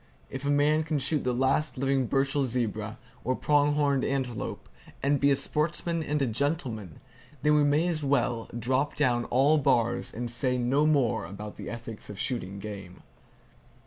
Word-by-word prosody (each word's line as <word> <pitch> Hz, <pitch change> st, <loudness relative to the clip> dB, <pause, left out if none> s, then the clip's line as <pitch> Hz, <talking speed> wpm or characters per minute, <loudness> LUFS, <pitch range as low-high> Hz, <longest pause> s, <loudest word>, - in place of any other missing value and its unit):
If 135 Hz, +1 st, -5 dB
a -, -, +1 dB
man 145 Hz, +2 st, +3 dB
can 155 Hz, -1 st, -1 dB
shoot 145 Hz, +1 st, 0 dB
the 125 Hz, -, +1 dB
last 135 Hz, +4 st, +1 dB
living 135 Hz, -1 st, +1 dB
Burchell 135 Hz, +1 st, +1 dB
zebra, 110 Hz, -3 st, -2 dB, 0.3 s
or 130 Hz, -, 0 dB
prong 145 Hz, +1 st, +2 dB
horned 140 Hz, -3 st, +2 dB
antelope, 130 Hz, -4 st, -3 dB, 0.4 s
and 140 Hz, 0 st, +2 dB
be 140 Hz, -, +4 dB
a 140 Hz, -, +4 dB
sportsman 165 Hz, +4 st, 0 dB
and 150 Hz, -1 st, -1 dB
a -, -, +3 dB
gentleman, 120 Hz, -, -2 dB, 0.4 s
then 150 Hz, 0 st, +4 dB
we 150 Hz, -1 st, +4 dB
may 145 Hz, +4 st, +3 dB
just 170 Hz, -3 st, -1 dB
as 145 Hz, -, -5 dB
well 125 Hz, -4 st, 0 dB
drop 130 Hz, +5 st, 0 dB
down 120 Hz, -1 st, +1 dB
all 140 Hz, +5 st, +3 dB
bars, 125 Hz, -5 st, +1 dB
and 120 Hz, +1 st, -4 dB
say 125 Hz, +1 st, +1 dB
no 135 Hz, +5 st, +2 dB
more 140 Hz, -7 st, +1 dB
about 105 Hz, +2 st, -8 dB
the -, -, -6 dB
ethics 115 Hz, -2 st, -8 dB
of 105 Hz, -, -7 dB
shooting 100 Hz, -7 st, -2 dB
game. 100 Hz, -3 st, -8 dB
135 Hz, 175 wpm, -28 LUFS, 120-145 Hz, 0.4 s, be